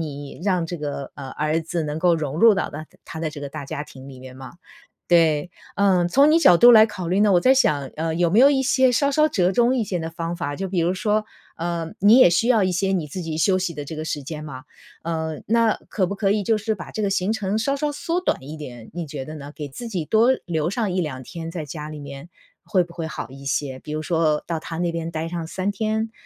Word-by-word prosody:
你， 145 -1 -7
让 185 -4 +1
这 175 +1 -5
个， 145 -2 -5
呃， 135 -2 -7
儿 155 +2 -1
子 165 +1 -3
能 150 +1 -3
够 175 0 +3
融 150 -2 -3
入 225 +1 +7
到 195 - -2
大 155 +1 -8 0.2
他 160 - -8
的 160 - -1
这 150 -1 -9
个 140 - -4
大 140 - -7
家 145 +2 -5
庭 135 -1 -13
里 130 -1 -11
面 130 0 -11
嘛。 130 0 -10 0.6
对， 165 -2 +3 0.3
嗯， 190 -3 +3
从 280 +8 +5
你 320 - +5
角 180 - +6
度 240 - +8
来 220 -1 +8
考 185 -6 -6
虑 190 +4 +2
呢， 210 -2 +4
我 175 - +5
在 260 +8 +5
想， 150 - +2
呃， 160 +1 -2
有 170 0 +2
没 210 +7 +4
有 275 +2 +8
一 270 -2 +2
些 260 0 +3
稍 280 +4 +2
稍 305 +2 +3
折 185 -4 +1
中 240 +3 +3
一 245 - +1
些 185 - -2
的 160 0 -4
方 165 +1 -4
法， 145 -3 -4
就 195 - -3
比 185 -2 -1
如 170 +2 +1
说， 210 +3 0 0.3
呃， 165 -1 -3
你 210 +5 +6
也 255 - +8
需 225 +8 +1
要 225 -4 +4
一 185 -1 +1
些 190 +2 0
你 175 -6 -1
自 180 +5 -6
己 160 -1 -4
休 185 +3 +3
息 180 -2 -2
的 145 -1 -6
这 155 - -7
个 155 - -4
时 150 -2 -3
间 150 +2 -7
嘛， 135 -2 -9 0.4
嗯， 160 -1 -3
那 230 0 +3
可 190 -4 0
不 195 - -4
可 200 0 0
以 205 -1 +1
就 220 +2 +2
是 220 +1 -2
把 170 - -9
这 215 - -4
个 200 - +1
行 195 +1 0
程 210 -1 -1
稍 275 +5 0
稍 295 +1 -1
缩 335 +4 -2
短 360 - -1
一 155 +3 -8
点， 120 -6 -10
你 170 -3 -5
觉 140 -2 -6
得 155 +3 -8
呢？ 145 -1 -9
给 150 -2 -6
自 235 - -8
己 185 -7 -3
多 225 - +4
留 160 -2 -1
上 210 0 -1
1-2 150 -8 -3
天 165 +4 -7
在 165 -2 -5
家 150 +1 -7
里 155 -1 -8
面， 140 +2 -9 0.4
会 185 -2 +2
不 170 0 -13
会 165 -2 -4
好 140 - -6
一 135 +1 -12
些？ 135 -1 -2
比 150 - -8
如 155 - -2
说 160 -2 +1
到 165 -2 -3
他 165 0 -7
那 175 0 0
边 165 0 -4
待 160 0 -4
上 170 -2 -4
3 190 +4 -2
天， 220 +2 -2
170 Hz, 280 characters per minute, -22 LUFS, 150-205 Hz, 0.6 s, 度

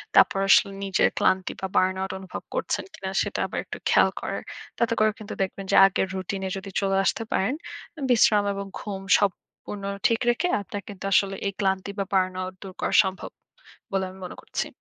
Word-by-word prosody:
তারপর 195 - +6
আসলে 195 - +6
নিজের 195 -1 +3
ক্লান্তি 185 0 +2
বা 190 - -1
burn 185 0 +3
out 190 - -2
অনুভব 190 -1 -7
করছেন - - -1
কিনা 190 - -5
সেটা - - -2
আবার - - -4
একটু - - -7
খেয়াল - - +5
করার। - - -3 0.4
তাতে 235 -1 +1
করে 215 0 +4
কিন্তু 215 - -7
দেখবেন 195 +1 -2
যে - - +4
আগের 195 0 +1
রুটিন 190 +1 -3
এ - - -3
যদি 195 +1 -7
চলে 195 -1 +1
আসতে 225 - 0
পারেন, 195 +7 +1 0.6
বিশ্রাম 215 -3 +5
এবং 200 0 -4
ঘুম 195 -2 -5 0.2
সম 205 -2 +3 0.3
পুর্ন 205 -1 -7 0.2
ঠিক 230 -1 +1
রেখে 285 +9 +1
আপনার 200 +2 -6
কিন্তু 200 -2 -9
আসলে 195 0 +3
এই 200 - -2
ক্লান্তি 190 0 0
বা - - +2
burn 185 -1 +2
out 185 0 -4
দূর 190 -2 -8
করা - - 0
সম্ভব 190 -1 -5 0.6
বলে 195 -1 +1
আমি 190 +1 -13
মনে - - -7
করছি। - - -3
195 Hz, 200 wpm, -25 LUFS, 190-205 Hz, 0.6 s, তারপর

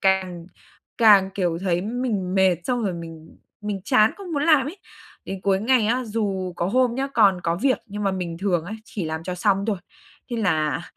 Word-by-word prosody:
càng 185 -3 0 0.5
càng, 205 -4 +6
kiểu, 175 -4 0
thấy 175 -2 0
mình 210 -4 -2
mệt 190 -2 +4
xong 245 -2 -1
rồi 190 - 0
mình 165 -1 -10 0.2
mình 210 -2 -4
chán 220 -4 +4
không 385 -4 -8
muốn 285 -2 0
làm 300 -5 +4
ấy. 330 +7 -6 0.5
Đến 195 -1 -6
cuối 195 -1 +2
ngày 235 0 +3
á, 245 +3 0
dù 200 -4 -2
có 170 - -1
hôm 245 +4 +2
nhá, 270 +2 -1
còn 195 -5 +4
có 170 0 -1
việc 265 -2 +3
nhưng 210 -1 -6
mà 195 - +2
mình 175 -3 -4
thường 180 -4 0
ấy, 200 +5 -6
chỉ 200 -6 -5
làm 160 0 -4
cho 180 0 -3
xong 195 +2 +1
thôi, 215 -3 0 0.5
thế 240 - -2
là 155 - 0
195 Hz, 210 wpm, -23 LUFS, 180-230 Hz, 0.5 s, càng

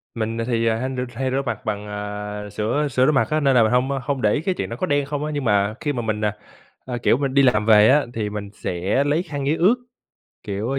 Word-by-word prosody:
mình 115 0 -2
thì 115 -2 +1
hen 130 +4 -2
r 125 - -3 0.2
hay 130 +1 -1
rửa 135 - 0
mặt 125 - -4
bằng, 105 -1 -3
à, 105 0 -5
sửa 115 +9 -1
sửa 130 -1 +2
rửa - - +4
mặt 135 - +2
á 155 - +1
nên 140 -3 +3
là 120 - +6
mình 110 - +1
hông 125 +2 +2 0.2
không 140 -3 -1
để 105 - +3
ý 145 - 0
cái 185 +3 0
chuyện - - -3
đó 115 - -5
có 135 - -2
đen 145 -4 +1
không 145 +1 -3
á, 155 - -3
nhưng 145 -2 -2
mà 100 -1 +2
khi 145 -1 -2
mà 120 - -2
mình, 110 -1 -2
à, 105 0 -2 0.5
a, 125 -1 -4
kiểu, 120 - +2
mình 135 -1 -2
đi 140 - +5
làm 110 -4 +3
về 105 -1 +7
á 145 +1 +4
thì 110 -3 -2
mình 105 -1 -6
sẽ 95 +9 -1
lấy 150 +4 +1
khăn 145 -5 -5
giấy 155 - +2
ướt, 190 +9 +4 0.7
kiểu, 105 +3 -3
a, 135 - 0
120 Hz, 280 wpm, -22 LUFS, 105-140 Hz, 0.7 s, về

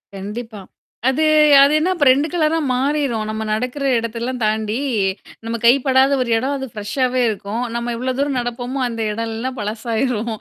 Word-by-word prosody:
கண்டிப்பா. 210 +2 -7 0.5
அது 310 +4 0 0.4
அது 280 +2 +5
என்னா 360 +4 +1
அப்ப 295 - +1
2 280 +4 +2
கலரா 320 -2 +1 0.2
மாறிரும். 265 -4 0
நம்ம 220 0 -3
நடக்குற 250 +6 -2 0.2
இடத்தெல்லாம் 235 +2 -4
தாண்டி 215 +1 0 0.7
நம்ம 230 +1 -2
கைப்படாத 265 +2 +4
ஒரு 245 - -2
இடம் 270 +4 -1
அது 265 - -5
ஃப்ரெஷ்ஷாவே 250 +4 -1
இருக்கும். 210 +3 -4
நம்ம 235 0 -2
எவ்வளோ 255 +2 -2
தூரம் 280 -2 0
நடப்போமோ 245 +2 -4
அந்த 230 -1 -5
இடம்லல்லாம் 230 +4 -4
பழசாயிரும். 225 +2 -2
245 Hz, 150 wpm, -19 LUFS, 225-265 Hz, 0.7 s, அது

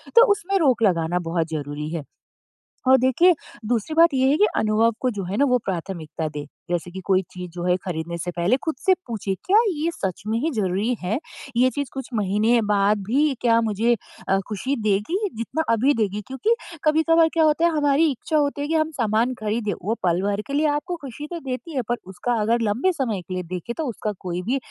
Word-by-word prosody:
तो 470 0 +9
उसमें 395 -1 +1
रोक 255 -7 +3
लगाना 175 -2 +2
बहुत 165 -1 0
ज़रूरी 150 0 -4
है। 165 -3 -3 0.8
और 265 0 +7
देखिए 300 +8 +5 0.3
दूसरी 235 +5 -1
बात 330 -1 +6
ये 260 0 +3
है 285 - +4
कि 420 - +5
अनुभव 220 +2 +3
को 255 - +2
जो 200 -3 -4
है 195 +4 -3
ना 285 - +4
वो 250 -2 +3
प्राथमिकता 170 -3 -4
दें। 150 -1 -6 0.3
जैसे 175 0 -2
कि 190 - -7
कोई 190 -1 +3
चीज़ 180 -1 -7
जो 175 0 -6
है 180 0 +3
ख़रीदने 170 -1 -3
से 175 +1 -4
पहले 175 +8 +1
ख़ुद 320 - -1
से 380 - +6
पूछिए, 205 -4 -2
क्या 395 +3 +4
ये 320 -2 -1
सच 190 - -4
में 220 +1 0
ही 320 +6 0
ज़रूरी 205 +3 0
है? 195 +8 -1 0.4
ये 255 +2 +5
चीज़ 285 0 -4
कुछ 270 -1 -6
महीने 215 +3 +2
बाद 205 +1 +3
भी 280 +5 +2
क्या 230 -1 +4
मुझे 225 +2 +2 0.3
अ, 195 - +3
खुशी 255 +7 -2
देगी 210 - +1 0.2
जितना 260 +7 -2
अभी 260 +6 +3
देगी? 210 -3 -1
क्योंकि 420 - +1 0.3
कभी-कभार 320 +1 +4
क्या 330 - +3
होता 310 +2 +3
है 340 - +4
हमारी 290 +2 +3
इच्छा 305 +5 -2
होती 285 -1 0
है 290 - -2
कि 325 - 0
हम 315 0 +1
सामान 225 +3 +2
ख़रीदें 215 0 -1
वो 220 +4 0
पल 175 0 +2
भर 205 0 0
के 280 - -5
लिए 300 +2 +2
आपको 350 +4 -4
खुशी 275 +3 -7
तो 340 - -3
देती 275 +3 -6
है 260 - +1
पर 240 - +2
उसका 195 +6 -2
अगर 230 +2 +2
लंबे 230 - +1
समय 230 - -2
के 185 +2 -8
लिए 180 - -2
देखे 185 +7 -4
तो 320 - -1
उसका 215 -1 -3
कोई 180 -1 -4
भी 240 +9 0
230 Hz, 220 wpm, -23 LUFS, 190-285 Hz, 0.8 s, तो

